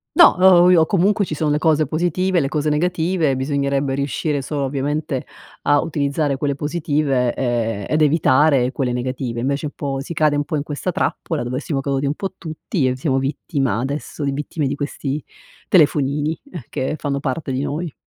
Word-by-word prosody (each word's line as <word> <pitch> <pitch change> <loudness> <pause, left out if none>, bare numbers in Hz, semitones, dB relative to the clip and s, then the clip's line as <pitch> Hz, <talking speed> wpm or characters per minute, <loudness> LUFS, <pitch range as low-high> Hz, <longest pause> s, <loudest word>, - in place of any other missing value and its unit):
No, 345 - +9
o 180 -1 +7
i 165 -3 +6
comunque 200 +3 +2
ci 155 - -4
sono 150 0 0
le 150 - +1
cose 155 -2 +3
positive, 175 +4 0
le 140 - 0
cose 150 0 0
negative, 165 -2 +1
bisognerebbe 140 0 0
riuscire 140 +1 -1
solo 145 +1 -3
ovviamente 140 +1 -2 0.4
a 145 0 +4
utilizzare 145 -2 -1
quelle 140 +1 -1
positive, 145 -5 0
e 115 -5 -1
ed 155 +1 +1
evitare 145 -3 +4
quelle 130 -4 -1
negative, 125 -1 -3
invece 140 +4 -1
un 145 - -7
po' 135 -2 -3
si 145 - -6
cade 155 -2 +2
un 145 0 0
po' - - -3
in 145 - -1
questa 150 +5 -3
trappola 160 -3 -2
dove 125 +2 -3
siamo 145 -1 -2
caduti 140 0 -1
un 145 - -1
po' 190 +2 -4
tutti, 155 - -2
e 130 - 0
siamo 135 -1 0
vittima 135 -1 -1
adesso 145 +3 -4
di 140 - 0
vittime 150 +2 -3
di 135 - 0
questi 145 0 -4 0.4
telefonini, 150 -2 +2 0.3
che 135 +4 -2
fanno 140 -2 -2
parte 140 +1 -3
di 130 +1 -1
noi. 155 +2 -3
145 Hz, 185 wpm, -20 LUFS, 135-155 Hz, 0.4 s, No